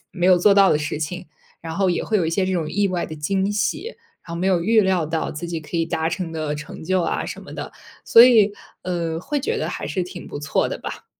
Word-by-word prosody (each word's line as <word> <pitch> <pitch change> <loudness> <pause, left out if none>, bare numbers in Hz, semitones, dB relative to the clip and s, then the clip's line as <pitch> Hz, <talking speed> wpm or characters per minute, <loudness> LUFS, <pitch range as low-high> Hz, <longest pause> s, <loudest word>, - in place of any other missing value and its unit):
没 180 -2 0
有 185 -1 +6
做 200 +3 +5
到 195 -1 +6
的 150 - +3
事 150 0 -3
情， 180 +4 -4 0.3
然 165 -1 -6
后 190 -1 +2
也 175 - -1
会 220 - +1
有 180 - +1
一 160 - 0
些 185 +2 0
这 190 - -1
种 160 -4 -1
意 205 -1 +1
外 180 -2 -1
的 155 - -7
惊 190 +6 0
喜， 220 - -1 0.4
然 170 - -9
后 - - -3
没 185 +2 -1
有 180 -3 +2
预 220 +3 +4
料 190 -4 +1
到 160 +1 -2
自 170 +3 -6
己 165 -1 -3
可 155 +2 -6
以 165 - +2
达 160 0 -1
成 170 0 -3
的 155 -2 -3
成 150 +1 -8
就 185 0 +1
啊 - - -2
什 - - -7
么 - - -11
的。 - - -7 0.3
所 230 +1 +8
以， 215 -5 +5 0.3
呃， 170 -3 -2
会 290 - -2
觉 450 - -1
得 - - -2
还 - - -5
是 185 -3 -1
挺 180 0 -9
不 - - -6
错 145 - 0
的 - - -5
吧。 - - -7
180 Hz, 290 characters per minute, -22 LUFS, 165-195 Hz, 0.4 s, 所